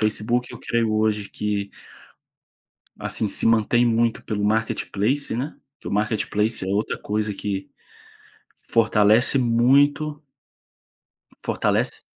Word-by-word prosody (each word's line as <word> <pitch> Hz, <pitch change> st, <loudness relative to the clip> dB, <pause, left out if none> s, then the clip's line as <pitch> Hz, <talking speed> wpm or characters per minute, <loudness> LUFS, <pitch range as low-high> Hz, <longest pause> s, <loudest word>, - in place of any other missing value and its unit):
Facebook 110 Hz, +3 st, -1 dB
eu -, -, -9 dB
creio 115 Hz, -2 st, 0 dB
hoje 110 Hz, -1 st, 0 dB
que 100 Hz, -1 st, -3 dB, 1.3 s
assim 110 Hz, -, -2 dB
se 100 Hz, -, 0 dB
mantém 115 Hz, +2 st, +3 dB
muito 115 Hz, 0 st, +1 dB
pelo 105 Hz, -2 st, -3 dB
Marketplace, 110 Hz, +4 st, 0 dB
né, 135 Hz, +6 st, -4 dB, 0.2 s
porque -, -, -12 dB
o -, -, -4 dB
Marketplace 105 Hz, 0 st, 0 dB
é -, -, -5 dB
outra 105 Hz, +2 st, -1 dB
coisa 105 Hz, 0 st, -2 dB
que 100 Hz, -1 st, -4 dB, 1.0 s
fortalece 110 Hz, +3 st, +4 dB
muito 140 Hz, +5 st, +2 dB, 1.2 s
Fortalece -, -, -1 dB
110 Hz, 110 wpm, -23 LUFS, 105-120 Hz, 1.3 s, fortalece